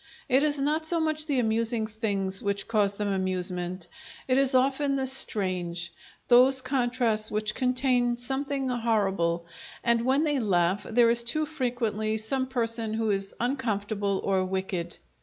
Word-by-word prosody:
It 260 +2 +3
is 295 -1 +1
not 305 +3 0
so 335 0 +1
much 310 -1 0
the 285 -3 0
amusing 230 -1 +1
things 200 -3 -2
which 200 -1 -2
cause 205 -3 +1
them 205 0 -2
amusement; 185 -2 -2 0.4
it 255 - +2
is 270 -1 +1
often 275 +2 +2
the 265 -1 -1
strange, 185 -9 0 0.4
those 255 +2 +6
contrasts 245 -4 0
which 215 0 -2
contain 250 -2 +1
something 270 +2 -2
horrible, 195 -8 0 0.4
and 235 -1 +2
when 265 +4 +2
they 295 -3 +1
laugh 190 -2 +1
there 230 0 +4
is 235 0 +2
too 305 +7 0
frequently 240 -7 -2
some 260 +5 -2
person 230 -3 -1
who 220 -1 0
is 195 0 -2
uncomfortable 210 -6 -1
or 190 -1 +1
wicked. 185 -2 -3
230 Hz, 150 wpm, -27 LUFS, 200-260 Hz, 0.4 s, those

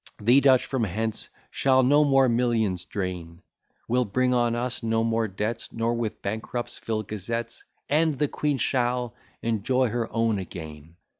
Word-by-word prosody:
_ - - -10
The 125 +4 +6
Dutch 130 -2 +5
from 130 -4 -1
hence 110 +3 -3 0.2
shall 130 -1 +3
no 145 +4 +5
more 135 -2 +4
millions 115 -6 +1
drain: 90 -3 -5 0.4
We'll 125 +1 +2
bring 125 +5 +1
on 120 -1 +2
us 120 +1 -3
no 115 -1 +1
more 115 0 +1
debts, 105 +4 -4
Nor 115 +1 -1
with 115 -2 -3
bankrupts 110 +4 -4
fill 110 -1 -2
gazettes; 115 +3 -5 0.2
"And 155 0 +2
the 150 - +1
Queen 145 0 -1
shall 125 -2 0 0.3
enjoy 115 +3 +1
her 115 0 -2
own 115 -2 +1
again." 80 -3 -9
115 Hz, 160 wpm, -26 LUFS, 105-125 Hz, 0.4 s, The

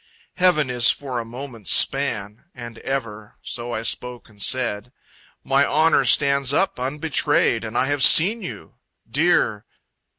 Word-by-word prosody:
Heaven 170 -8 +3
is 120 -1 +3
for 130 -4 -2
a 115 - -6
moment's 120 -3 -9
span. 110 -5 +1
And 120 -2 -10
ever. 110 -6 -6
So 120 0 -6
I 110 -1 -3
spoke 125 +1 -4
and 105 -2 -17
said, 120 -1 -1 0.5
"My 135 +1 +2
honor 155 +2 +2
stands 140 -2 +2
up 195 -1 0
unbetrayed, 145 +4 0
And - - -5
I - - +2
have 145 0 -2
seen 205 - +5
you. - - -10 0.3
Dear..." - - +1
130 Hz, 140 wpm, -21 LUFS, 115-145 Hz, 0.5 s, seen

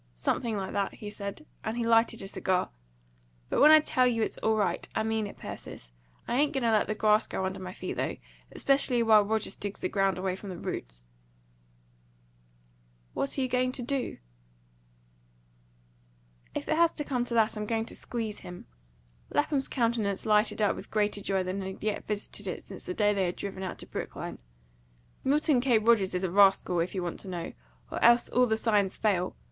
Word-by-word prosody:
"Something 220 - -1
like 190 -1 -4
that," 200 -1 -1
he 205 -1 -8
said, 200 +8 -6 0.2
and 220 +2 -3
he 235 - -1
lighted 230 -1 +3
a - - -6
cigar. 185 -1 -1 0.8
"But - - +1
when 300 - +9
I 310 0 +9
tell 255 -4 +2
you 230 -2 +1
it's - - -2
all 220 0 +2
right, 205 -3 -1
I 220 - +1
mean 220 -1 -1
it, - - -11
Persis. - - -9 0.4
I 240 - 0
ain't 290 +1 +2
going 270 -3 -1
to 230 - +3
let 215 -1 +3
the 215 - -1
grass 215 0 +3
grow 190 - -2
under 190 +1 -3
my 185 -1 -6
feet, - - -6
though, - - -2 0.3
especially 270 -3 +2
while 215 -2 +6
Rogers 220 +1 -1
digs 205 -1 -5
the - - -2
ground 195 -2 +1
away 185 0 -1
from 195 +1 -9
the 180 - -6
roots." - - -6 2.1
"What 275 - -2
are - - +1
you - - 0
going 255 0 +1
to 250 - -4
do?" 270 +1 -2 2.4
"If - - -4
it 310 - +1
has 335 0 +5
to 295 - -3
come 255 -4 -1
to 235 - -3
that, 220 -1 +3
I'm 210 0 -4
going 225 0 0
to - - -5
squeeze 225 -3 -4
him." 180 0 -10 0.6
Lapham's 290 -2 +1
countenance 230 -5 0
lighted 210 0 +3
up 205 - +2
with 195 - -9
greater 205 -1 0
joy 195 -1 0
than 185 +2 -3
had 190 +1 -7
yet 215 -1 -2
visited 210 -1 -2
it 180 - -4
since 190 - -11
the 180 - -3
day 210 -1 +3
they 195 -2 +1
had 175 - -2
driven 195 -1 -6
out 185 -2 -4
to - - -8
Brookline. - - -6 0.8
"Milton 285 -1 +3
K. 245 -3 +4
Rogers 215 -4 +3
is 180 - -1
a 185 - -1
rascal, 195 -2 +4
if 175 +3 -1
you 185 - -1
want 175 - -4
to - - -5
know; 175 -2 -5 0.4
or - - -3
else 235 +1 +6
all 250 0 +3
the 220 -1 +1
signs 210 -4 +2
fail. 185 -4 0
215 Hz, 205 wpm, -29 LUFS, 195-235 Hz, 2.4 s, when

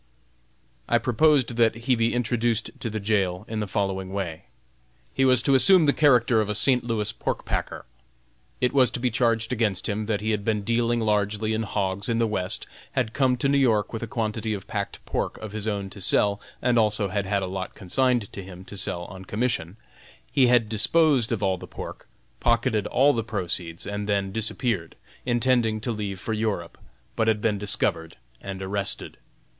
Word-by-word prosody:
I - - +4
proposed 130 -1 +2
that 115 -2 +4
he 115 +3 0
be 115 0 +1
introduced 120 -2 0
to - - -7
to 115 - -3
the 110 0 -3
jail 100 -2 0
in 110 -1 -3
the 105 - -2
following 95 -2 -2
way: 90 -5 -4 0.7
He 135 - +2
was 125 -2 +4
to 140 - +3
assume 175 +5 +6
the 145 - +4
character 125 -6 +4
of 105 - -3
a 105 - 0
St. 125 +4 +3
Louis 110 -3 -1
pork - - -4
packer. - - -3 0.7
It 125 +1 +1
was 130 -3 +5
to - - -4
be 125 0 0
charged 115 0 +1
against 105 -6 0
him 105 0 -2
that 105 -2 0
he 110 +1 0
had 105 -2 -1
been 105 -1 0
dealing 115 +1 +1
largely 105 0 0
in 110 - 0
hogs 100 -1 -2
in 115 - +1
the 115 - +2
West, 105 -4 -2 0.3
had 110 - -1
come 130 -2 +2
to 130 - 0
New 140 0 +3
York 110 -6 +2
with 115 - -4
a 115 - -4
quantity 110 -1 -2
of 95 -1 -8
packed 100 -2 -4
pork - - -2
of 110 -2 -8
his 110 0 -3
own 100 -2 -2
to 100 - -10
sell; 100 +2 +2 0.2
and 120 -2 +3
also 105 -2 +2
had 100 0 -2
had 100 0 0
a - - -1
lot 95 0 -5
consigned 120 +3 0
to 100 - -6
him 95 -1 -11
to 100 - -9
sell 90 -2 -3
on 95 +1 -10
commission; 105 -4 -2 0.5
he 130 -3 +4
had 120 -2 +4
disposed 130 +3 +2
of 110 -3 -1
all 95 -2 +1
the - - -9
pork, - - -9 0.3
pocketed 110 -3 +1
all 145 +2 +4
the 115 - -1
proceeds, 90 -5 -2
and 105 0 -4
then 100 -1 0
disappeared, 110 -4 -2 0.3
intending 120 -2 +2
to 120 +3 -3
leave 100 -4 -4
for 110 - -3
Europe, 105 -6 -2 0.4
but 110 - +1
had 110 -1 +2
been 105 -1 0
discovered 80 -5 +2 0.2
and 95 -1 -6
arrested. 100 +1 -3
110 Hz, 200 wpm, -25 LUFS, 100-120 Hz, 0.7 s, assume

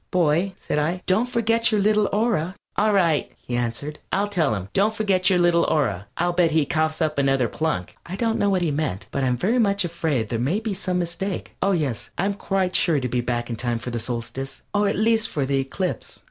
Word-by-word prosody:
"Boy!" 175 +2 +2
said 150 - -2
I, 170 +5 -1
"don't 220 +7 +2
forget 230 -1 +2
your 215 - +2
little 210 0 +3
aura." 200 -5 0 0.2
"All 215 +1 +3
right," 170 -7 +2
he 120 - -5
answered, 120 +5 -3
"I'll 205 +2 +1
tell 160 - +1
him 95 -1 -6
'Don't 210 +3 +2
forget 195 -4 +2
your 185 - +3
little 175 -1 +4
aura.' 100 - 0
I'll 175 +1 +1
bet 175 -1 +3
he 155 -1 +2
coughs 155 +2 0
up 155 -2 0
another 135 -3 +2
plunk." 130 - -2
I 180 - -4
don't 225 +1 0
know 205 - +3
what 185 -2 +1
he 160 - +1
meant, 145 -10 -2
but 135 - -1
I - - +2
am 125 -1 +1
very 225 - +1
much 200 -3 +2
afraid 160 -10 -1
there 115 - -1
may 145 - +1
be 220 -2 -3
some 185 -1 -2
mistake. 180 +3 -3
Oh, 195 - +3
yes, 145 - -2
I 185 - +1
am 200 - +1
quite 190 -2 -1
sure 160 -5 +3
to 125 - -2
be 125 0 0
back 120 0 -2
in 115 - -3
time 120 0 0
for 120 +2 -6
the 120 - -2
Solstice. 125 +3 -5
Or 205 0 +2
at - - -1
least 220 0 +2
for 140 -3 -1
the 135 0 +1
Eclipse. 175 +8 -3
170 Hz, 235 wpm, -23 LUFS, 135-200 Hz, 0.2 s, little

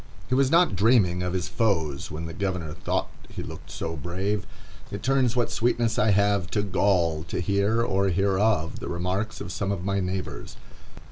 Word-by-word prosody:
He - - 0
was 135 0 +4
not 170 - +4
dreaming 100 -4 +3
of 90 0 -2
his 90 -2 -1
foes 80 - 0
when 80 +2 -5
the 80 - -6
governor 90 -4 -3
thought 90 - -2 0.2
he - - -6
looked - - -9
so 80 0 -4
brave. 95 +6 -2 0.4
It - - -6
turns 130 -2 +2
what 120 -2 +1
sweetness 120 -1 +1
I 110 - +3
have 100 -3 +2
to 105 - +2
gall, 90 -5 +1
to 85 - -3
hear, 100 +5 +1
or 100 -3 +1
hear 95 +1 +1
of, 100 -7 +1
the - - -6
remarks 90 +5 -2
of 90 - -5
some 100 +2 -2
of 95 -2 -3
my 100 0 +1
neighbors. 95 0 -4
100 Hz, 190 wpm, -26 LUFS, 90-110 Hz, 0.4 s, was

